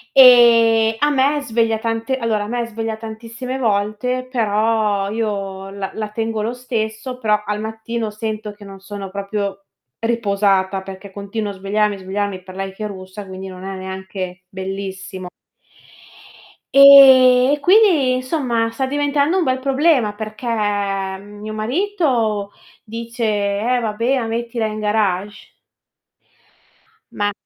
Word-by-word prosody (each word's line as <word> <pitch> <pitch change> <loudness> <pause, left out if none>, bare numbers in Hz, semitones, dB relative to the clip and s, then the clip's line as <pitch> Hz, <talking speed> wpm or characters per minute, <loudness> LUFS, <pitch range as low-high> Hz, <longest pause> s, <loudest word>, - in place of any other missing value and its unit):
E 230 -3 +7
a 295 - +3
me 285 +2 +2
sveglia 225 -3 0
tante 230 +4 -2
allora, 220 -4 -1
a - - -7
me 240 0 -2
sveglia 225 -1 -4
tantissime 230 +4 -6
volte, 225 +3 -1
però 215 -3 +1
io 195 -3 -3
la 195 -1 -5
la 215 -1 -4
tengo 225 0 -3
lo 230 +3 -2
stesso, 245 0 -4
però 210 -2 +1
al 210 0 -2
mattino 220 +1 -4
sento 215 0 -5
che 205 -1 -14
non 195 -1 -11
sono 195 0 -7
proprio 200 0 -4 0.3
riposata, 200 -4 +1
perché 190 +1 -10
continuo 200 +1 -4
a - - -9
svegliarmi, 205 +1 0
svegliarmi 190 0 -3
per 185 0 -12
lei 195 0 -4
che 215 +1 -5
russa, 190 +1 -9
quindi 190 0 -8
non 185 0 -10
è 195 - -5
neanche 190 -1 -6
bellissimo. 190 -1 -6 1.4
Ehm, 265 -2 +8
e, 295 - -1
quindi, 350 -9 +5
insomma, 255 -4 -1
sta 260 +3 -2
diventando 290 +4 +1
un 355 - +2
bel 260 -2 +1
problema 270 -5 +2
perché 215 +2 -8
mio 205 -1 -2
marito 235 - 0 0.3
dice: 230 +2 -6
"Eh, 210 +3 0
vabbè, 230 +5 0
ma 230 - -3
mettila 230 0 -2
in 215 0 -5
garage". 210 -1 -1 1.6
Ma 205 0 -1
215 Hz, 135 wpm, -19 LUFS, 200-240 Hz, 1.6 s, Ehm